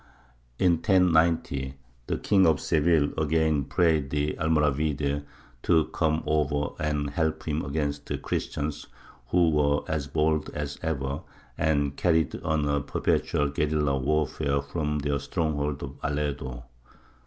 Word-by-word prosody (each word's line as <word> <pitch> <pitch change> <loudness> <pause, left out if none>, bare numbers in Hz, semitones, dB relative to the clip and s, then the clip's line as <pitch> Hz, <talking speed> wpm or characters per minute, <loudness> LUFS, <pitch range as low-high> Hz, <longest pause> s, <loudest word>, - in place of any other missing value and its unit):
In 90 -2 +3
1090 80 -7 +2 0.3
the - - -1
King 95 -3 +3
of 80 -4 +3
Seville 80 -1 +2
again 80 -2 +1
prayed 80 -5 +2
the 75 +1 0
Almoravide 75 -2 0 0.4
to 80 +1 +3
come 80 0 +1
over 75 -1 +1
and 75 -2 -1
help 80 +1 -1
him 75 0 -1
against 70 0 -3
the - - -2
Christians, 75 0 -3 0.4
who 85 0 +3
were 75 -1 +2
as 75 -3 -2
bold 80 0 +1
as 75 -1 -4
ever, 70 -3 -2 0.3
and 70 -3 +1
carried 80 -3 +1
on 80 -2 0
a 70 0 +1
perpetual 70 0 0
guerilla 75 -1 0
warfare 70 0 0
from 75 +1 -2
their 70 -1 -1
stronghold 75 -1 -2
of 70 -1 -8
Aledo. 70 -4 -3
75 Hz, 130 wpm, -27 LUFS, 70-80 Hz, 0.4 s, In